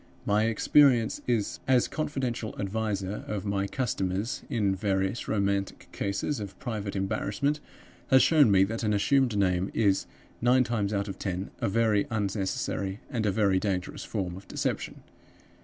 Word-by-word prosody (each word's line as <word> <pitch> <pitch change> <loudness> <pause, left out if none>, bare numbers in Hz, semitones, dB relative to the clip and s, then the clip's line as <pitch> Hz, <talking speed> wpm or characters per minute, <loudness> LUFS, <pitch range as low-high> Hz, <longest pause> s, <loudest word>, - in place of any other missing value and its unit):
My 105 +1 +2
experience, 120 +1 +4
as 120 +2 +1
confidential 130 -7 -3
adviser 100 -1 -2
of 105 -1 -3
my 100 -1 0
customers, 100 -2 -2
in 105 -7 +1
various 95 +1 -1
romantic 100 -2 -1
cases 100 +8 -2
of 100 -2 -7
private 105 -5 -4
embarrassment, 110 +9 -1 0.5
has 130 -1 +6
shown 150 -7 +5
me 95 -1 +5
that 110 +3 -2
an 105 -2 +1
assumed 130 +1 +2
name 95 -1 +1
is, 100 -3 +2 0.3
nine 125 +2 +4
times 110 -5 -1
out 100 0 -1
of 95 - -6
ten, 95 0 -3
a - - 0
very 105 -1 +2
unnecessary 100 -2 -2
and 115 -5 0
a - - +3
very 95 -2 +2
dangerous 95 -3 -3
form 95 -5 -3
of 95 +1 -11
deception. - - -3
105 Hz, 145 wpm, -28 LUFS, 95-115 Hz, 0.5 s, has